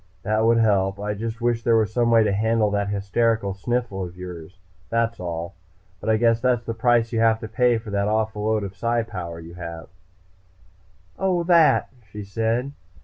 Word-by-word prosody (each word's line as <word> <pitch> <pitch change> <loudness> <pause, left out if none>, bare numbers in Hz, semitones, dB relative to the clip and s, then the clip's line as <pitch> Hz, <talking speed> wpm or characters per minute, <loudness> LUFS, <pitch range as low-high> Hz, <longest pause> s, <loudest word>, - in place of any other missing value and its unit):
"That 110 +1 +1
would 115 0 +4
help. 100 -3 +2
I 105 0 -2
just 115 +3 -5
wish 120 -1 +1
there 115 -1 +3
was 110 -1 0
some 120 0 +2
way 115 -1 +5
to 105 - +1
handle 110 +1 +1
that 100 0 -1
hysterical 100 +1 0
sniffle 110 -1 -2
of 90 0 -8
yours, 90 -1 -9 0.3
that's 115 0 0
all. 85 -1 -5 0.5
But 110 - -4
I 110 - +4
guess 115 0 +2
that's 125 -2 +1
the 115 - -3
price 120 0 +2
you 115 - +1
have 115 0 +3
to 110 - -5
pay 120 +2 +2
for 110 -1 -8
that 100 0 0
awful 110 -1 -1
load 110 -1 +1
of 100 -1 -6
Psi 115 +2 0
power 85 -6 -7
you 85 +1 -11
have." 85 -2 -8 1.3
"Oh, 185 -2 +1
that," 170 -2 +4 0.2
she 105 +1 -7
said. 115 +6 -1
110 Hz, 195 wpm, -23 LUFS, 100-115 Hz, 1.3 s, way